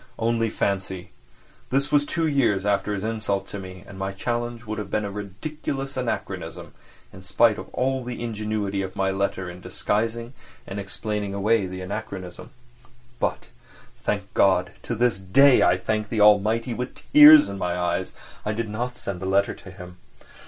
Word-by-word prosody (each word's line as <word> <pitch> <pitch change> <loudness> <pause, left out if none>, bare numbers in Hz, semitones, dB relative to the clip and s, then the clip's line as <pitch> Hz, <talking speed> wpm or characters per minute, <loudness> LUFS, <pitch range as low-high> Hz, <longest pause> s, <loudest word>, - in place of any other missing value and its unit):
Only 115 0 +1
fancy, 95 -3 -2 0.6
this 140 +3 0
was 145 -1 +3
two 165 0 0
years 115 -10 +2
after 100 0 +1
his 100 - -4
insult 110 -3 -1
to 100 - -6
me, 95 -1 -9
and 95 -1 -11
my 95 0 -3
challenge 120 +3 -3
would 110 0 -4
have 105 -2 -5
been 105 +1 -1
a 100 - -4
ridiculous 135 +7 -5
anachronism, 90 - -4 0.4
in 95 - -11
spite 100 +3 +3
of - - -9
all 130 0 -1
the 120 -1 -5
ingenuity 105 -3 -2
of 95 -1 -5
my 95 0 +1
letter 95 -1 -1
in 90 +1 -9
disguising 115 +6 -2 0.3
and 95 - -5
explaining 100 0 -4
away 105 0 +2
the 95 0 -6
anachronism. 95 -2 -6 0.7
But, - - -2 0.5
thank - - -2
God - - +3
(to - - -4
this 120 -3 +1
day 125 +9 +5
I - - +4
thank 110 -1 -2
the 115 - -1
Almighty 105 +3 +4
with 125 +2 -6
tears 300 +1 +10
in 100 - -6
my 90 -1 -1
eyes) 90 +1 -1 0.3
I 105 - -1
did 115 0 -3
not 120 +4 -4
send 100 -6 -5
the 95 - -4
letter 100 +1 +2
to - - -13
him. 90 0 -11
105 Hz, 175 wpm, -24 LUFS, 95-115 Hz, 0.7 s, tears